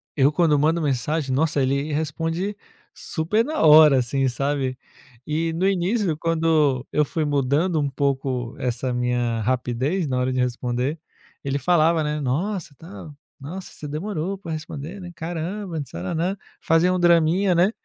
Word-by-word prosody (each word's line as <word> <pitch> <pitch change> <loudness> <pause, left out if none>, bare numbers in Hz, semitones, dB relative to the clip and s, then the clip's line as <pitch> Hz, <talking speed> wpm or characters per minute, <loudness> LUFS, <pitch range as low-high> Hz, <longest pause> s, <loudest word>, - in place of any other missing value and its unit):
eu 140 0 +4
quando 155 -2 +3
mando 160 +4 +2
mensagem, 140 0 -1
nossa, 150 +1 +1
ele 140 +3 0
responde 165 +6 -2 0.4
super 195 +8 -1
na 310 +3 -2
hora, 150 -3 +8
assim, 135 +2 0
sabe. 135 +1 -1 0.5
E 160 +2 -1
no 180 +4 +1
início, 190 -2 0
quando 160 -5 +1
eu 150 0 +2
fui 155 +3 -2
mudando 145 +4 +1
um 145 - 0
pouco 130 -3 -2
essa 125 +1 -2
minha 120 -2 0
rapidez 130 - -1
na 130 -2 -1
hora 125 +1 0
de 130 - -1
responder 125 +4 -1 0.4
ele 140 0 -1
falava, 165 +1 +3
né: 150 0 -2
"Nossa, 160 +6 -2
tal. 165 -3 -11 0.3
Nossa, 175 +7 -8
você 150 - -8
demorou 175 +4 -3
para 170 - -7
responder, 155 +3 -6
né. 180 -2 -8
Caramba, 170 +2 -4
tananã", 160 - -2 0.2
fazia 165 +3 +3
um 185 - 0
draminha, 175 +2 +4
né. 175 +4 +3
155 Hz, 150 wpm, -23 LUFS, 135-170 Hz, 0.5 s, hora